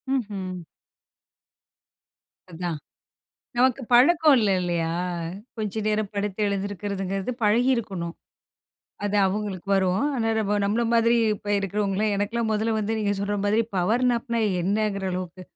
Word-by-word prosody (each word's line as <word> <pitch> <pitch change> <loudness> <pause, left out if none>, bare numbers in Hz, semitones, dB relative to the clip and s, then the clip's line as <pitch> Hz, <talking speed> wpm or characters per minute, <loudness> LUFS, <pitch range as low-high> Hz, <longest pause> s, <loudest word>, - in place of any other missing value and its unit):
ம்ஹ்ம். 195 -6 -4 1.9
அதான். 170 -1 -3 0.8
நமக்கு 260 +1 +3
பழக்கம் 305 +4 +6
இல்ல 210 -3 +2
இல்லையா! 170 -2 -1 0.7
கொஞ்ச 215 0 -3
நேரம் 210 -1 0
படுத்து 205 0 -3
எழுந்துக்கிறதுங்கிறது 200 +1 -3
பழகியிருக்கணும். 210 -6 +1 0.9
அது 205 0 0
அவுங்களுக்கு 195 -1 -3
வரும். 190 +4 +1
ஆனா, 225 -3 0
நம்ம, 210 -1 +1
நம்மள 210 +4 +1
மாதிரி 230 +1 +4 0.2
இப்ப 205 0 -6
இருக்கிறவங்கலாம் 200 +1 0
எனக்கெல்லாம் 220 +3 -1
மொதல்ல 220 +1 0
வந்து 215 +1 -1
நீங்க 205 -1 +1
சொல்ற 205 +1 -1
மாதிரி 215 +3 +3
பவர் 220 +8 +2
நாப்னா 235 -1 -1 0.2
என்னங்கிற 200 0 0
அளவுக்கு 185 0 -5
205 Hz, 115 wpm, -25 LUFS, 195-225 Hz, 1.9 s, பழக்கம்